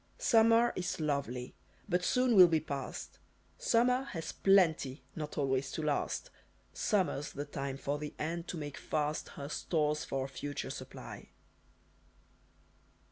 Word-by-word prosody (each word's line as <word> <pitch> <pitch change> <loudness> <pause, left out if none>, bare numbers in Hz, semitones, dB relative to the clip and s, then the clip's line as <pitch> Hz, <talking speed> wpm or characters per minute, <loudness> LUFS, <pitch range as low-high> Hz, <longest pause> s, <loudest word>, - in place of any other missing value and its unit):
Summer 230 - +5
is 180 -2 -2
lovely, 140 -5 -2 0.3
but 180 -2 +1
soon 250 +3 +3
will 185 -2 +10
be 165 -2 +2
past. 140 -4 -6 0.4
Summer 250 +2 +3
has 165 -2 -4
plenty 165 -8 +3
not 150 -2 -5
always 135 -2 0
to 160 - -3
last. 150 -1 -1 0.4
Summer's 185 -9 0
the 145 +1 -4
time 140 -2 -4
for 140 +1 -2
the 150 0 -6
ant 170 +2 -3
to 175 - -4
make 145 -2 -5
fast 150 0 -2
Her 140 - -7
stores 150 0 0
for 135 -1 -2
a - - -4
future 145 +1 -5
supply!" - - -8
150 Hz, 135 wpm, -33 LUFS, 140-180 Hz, 0.4 s, will